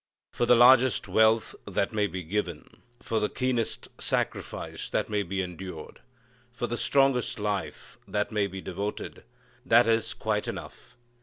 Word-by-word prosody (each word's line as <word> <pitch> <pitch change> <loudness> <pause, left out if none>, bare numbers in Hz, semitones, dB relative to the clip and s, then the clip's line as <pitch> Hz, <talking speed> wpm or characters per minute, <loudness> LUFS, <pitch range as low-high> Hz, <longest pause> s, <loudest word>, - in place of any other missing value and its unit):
For 120 - 0
the 125 - +7
largest 125 +1 +6
wealth 110 0 +3
that 100 +4 -1
may 105 -1 +1
be 90 0 -6
given, 85 -2 -4 0.2
for 115 - -1
the 105 - 0
keenest 125 -3 -1
sacrifice - - -3
that - - -1
may 105 -1 +1
be 95 0 -2
endured, 90 -2 -8 0.5
for 120 - -3
the 120 - -3
strongest 135 -1 +2
life 105 -2 -4
that 105 0 -1
may 105 -2 +1
be 95 0 -7
devoted 100 +4 -5 0.4
that 120 +2 +5
is 115 -1 +1
quite 105 -1 -1
enough. 125 - -8
105 Hz, 150 wpm, -27 LUFS, 100-120 Hz, 0.5 s, the